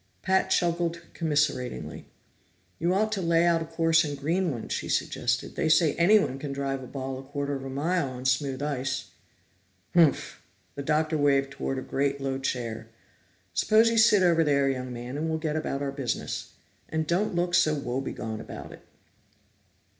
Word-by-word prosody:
Pat 190 0 +2
chuckled 170 -1 +1
commiseratingly. 145 -6 -1 0.7
"You 170 +2 +1
ought 215 +3 +1
to 200 -3 -1
lay 170 0 +3
out 170 -1 +3
a - - -3
course 165 0 +3
in 145 -2 -3
Greenland," 150 -3 -1
she - - -3
suggested. 120 0 -1
"They 160 - 0
say 155 -1 +4
anyone 170 -7 +3
can 145 0 -5
drive 135 -1 -2
a 130 - -8
ball 130 0 -5
a - - -7
quarter 140 +1 -4
of 135 -1 -4
a 135 - -6
mile 150 +3 0
on 125 0 -8
smooth 130 +1 0
ice." 135 -2 -3 0.8
"Humph!" 165 -5 +3 0.3
The 140 - -5
Doctor 155 +2 +1
waved 140 -1 +2
toward 135 -1 -3
a 130 - -4
great, 140 0 -1
low 135 -1 -2
chair. 120 -4 -3 0.7
"Suppose 225 +2 +4
you 230 - 0
sit 210 -3 +6
over 170 -2 +4
there, 140 -2 +2
young 130 -1 -4
man, 120 +3 -6
and 160 +2 -2
we'll 160 - 0
get 155 -1 -2
about 145 -3 -2
our 140 - -2
business. 135 -5 -4 0.4
And 160 0 -1
don't 180 +4 0
look 175 0 0
so 155 -3 +4
woe 135 -2 -2
begone 110 -4 -5
about - - -9
it." - - -12
145 Hz, 175 wpm, -27 LUFS, 135-170 Hz, 0.8 s, sit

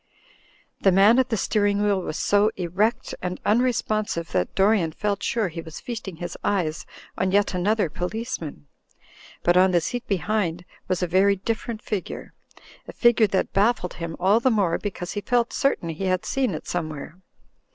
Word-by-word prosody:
The 195 - +4
man 200 +6 +6
at 260 0 +2
the 225 - 0
steering 205 0 +1
wheel 200 -2 +2
was 160 - -4
so 205 +1 +3
erect 205 +8 0
and 180 0 -3
unrespon 215 -2 +1
sive 170 0 -4
that 90 - -1
Dorian 195 -5 +3
felt 205 +1 -2
sure 220 -5 0
he 165 0 -6
was 160 -1 -9
feasting 225 -7 -6
his 175 +1 -6
eyes 175 -6 -1 0.3
on 185 0 +1
yet 205 0 +2
another 200 +2 +1
policeman. 180 - -5 0.8
But 175 +1 +4
on 185 +1 +6
the 175 -1 +3
seat 245 +9 -4
behind 190 -3 -1 0.2
was 185 -1 0
a - - +1
very 195 +3 +4
different 225 +3 -4
figure, 205 -4 -5 0.5
a - - -8
figure 235 -2 +4
that 190 -1 -1
baffled 200 -2 +2
him 165 -1 -5
all 195 +5 +4
the 260 - +3
more 200 -8 +1
because 180 -3 -5
he 205 - -3
felt 240 +3 +1
certain 275 -11 0
he 165 +4 -4
had 185 -1 0
seen 260 -10 0
it - - -7
somewhere. 155 0 -5
195 Hz, 175 wpm, -24 LUFS, 175-215 Hz, 0.8 s, man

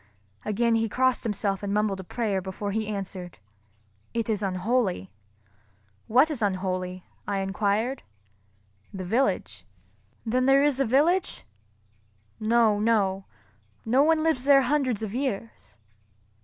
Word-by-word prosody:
Again 230 +2 +1
he 225 -1 +1
crossed 255 +2 +1
himself 200 -3 -1
and 200 -1 -3
mumbled 205 -1 0
a - - -6
prayer 205 -1 -2
before 190 +2 -5
he 220 +1 -2
answered, 195 -4 -6 0.8
"It 230 -1 -1
is 210 -2 -1
unholy." 190 - -1 1.0
"What 260 +8 +4
is 275 -6 -4
unholy?" 185 -2 -2 0.2
I 200 -1 -1
enquired. 205 +6 -1 0.9
"The 190 -1 -6
village." 185 - 0 0.6
"Then 255 +3 +1
there 275 +1 +5
is 290 -2 +2
a 275 - +3
village?" 310 +10 +1 0.9
"No, 220 -1 +3
no. 200 -3 +1 0.6
No 250 +5 +3
one 310 +1 +3
lives 320 -6 +1
there 275 -1 +6
hundreds 255 -7 0
of 210 -2 -4
years." 230 - -4
215 Hz, 130 wpm, -26 LUFS, 195-255 Hz, 1.0 s, there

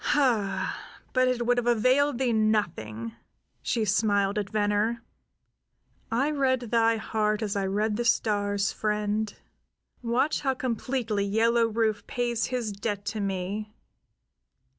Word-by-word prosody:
"Hah, 240 -9 +1 0.3
but 255 -1 +3
it 245 -1 0
would 245 +1 +3
have 240 - -3
availed 255 +4 +3
thee 250 -2 +1
nothing!" 170 - 0 0.5
she 230 -3 0
smiled 205 -1 +2
at 200 -1 -4
Venner. 215 +2 0 1.1
"I 270 +6 +1
read 265 -3 +2
thy 230 -1 +2
heart 215 0 -1
as 205 -2 -2
I 195 -1 0
read 210 +2 0
the 240 - 0
stars, 205 -3 +1
friend. 210 0 -1 0.7
Watch 245 +5 +1
how 270 -2 0
completely 240 -3 -1
Yellow 230 +3 +3
Rufe 220 -2 -1
pays 240 -2 -1
his 245 -4 -2
debt 205 0 -4
to 220 - -4
me. 200 +2 -3
220 Hz, 130 wpm, -27 LUFS, 205-240 Hz, 1.1 s, but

